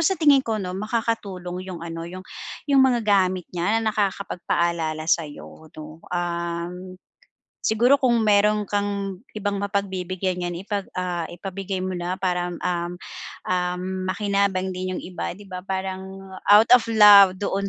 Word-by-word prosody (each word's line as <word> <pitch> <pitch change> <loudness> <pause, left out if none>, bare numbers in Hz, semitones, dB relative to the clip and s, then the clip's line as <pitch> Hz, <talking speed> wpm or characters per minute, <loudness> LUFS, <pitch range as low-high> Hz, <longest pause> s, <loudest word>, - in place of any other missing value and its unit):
sa 345 +3 +2
tingin 290 -4 +5
ko, 225 -4 -2
'no, 185 -3 -4
makakatulong 200 -4 -3
'yong, 175 -3 -6
ano, 165 0 -6
'yong 185 +1 -9 0.4
'yong 275 -1 +5
mga 255 -2 +4
gamit 185 -3 +2
niya 180 +6 +1
na 220 -1 0
nakakapagpaalala 170 -5 -1
sa 160 -1 +1
'yo, 155 +2 -12
'no. 155 +1 -10
Um, 175 +1 -4 0.7
siguro 245 +6 +3
kung 245 -3 +3
mayro'n 210 0 +4
kang 200 -2 -2 0.2
ibang 200 -1 -2
mapagbibigyan 185 -2 -2
niyan 175 +1 -4
ipag 200 -2 -3
ah, 175 -2 -2
ipabigay 190 +1 -5
mo 185 - -2
na 180 +1 -3
para, 180 -2 -1
hmm, 175 - -6
um, 175 -1 -1 0.5
um, 180 0 -1 0.3
makinabang 200 -1 0
din 185 0 -3
'yong - - -6
iba, 180 0 -4
'di 205 - -13
ba? 185 -1 -6
Parang 190 0 -5 0.2
out 210 +3 +8
of 250 - +7
love 205 -4 +8
doon 200 0 -1
190 Hz, 155 wpm, -23 LUFS, 180-205 Hz, 0.7 s, out